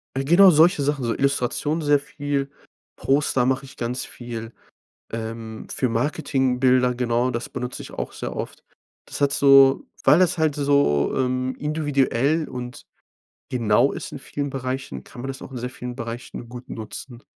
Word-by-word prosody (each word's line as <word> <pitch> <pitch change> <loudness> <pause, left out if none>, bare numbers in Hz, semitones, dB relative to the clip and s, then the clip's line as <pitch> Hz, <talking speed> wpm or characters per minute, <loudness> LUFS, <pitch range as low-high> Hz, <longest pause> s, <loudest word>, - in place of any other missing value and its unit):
Genau 170 +8 +6
solche 160 0 +5
Sachen, 140 -2 0
so 115 - 0
Illustration 140 +3 0
sehr 145 -1 +3
viel. 145 -1 -3 0.5
Poster 135 -2 +1
mache 130 +1 0
ich 135 - -14
ganz 125 +2 -2
viel, 115 -2 -7 0.6
ähm, 110 0 -6
für 130 - +1
Marketingbilder, 130 -1 +1
genau, 120 +1 +1
das 120 0 -3
benutze 125 -1 -5
ich - - -10
auch - - -5
sehr - - -6
oft. - - -6 0.4
Das - - -8
hat 140 0 +3
so 135 -1 +6 0.2
weil 150 +6 +6
das 180 -1 +3
halt 155 -2 +2
so, 140 - +2
ähm, 130 0 0
individuell 150 0 +1
und 125 -1 -7 0.7
genau 120 +2 +3
ist - - -6
in - - -7
vielen 140 0 -4
Bereichen, 130 - -4
kann 120 - -11
man 135 - -5
das 135 -1 -6
auch - - -9
in 125 - -6
sehr 125 +1 -4
vielen 125 -1 -7
Bereichen 115 0 -7
gut 125 0 -10
nutzen. 120 +3 -8
130 Hz, 160 wpm, -23 LUFS, 120-145 Hz, 0.7 s, Genau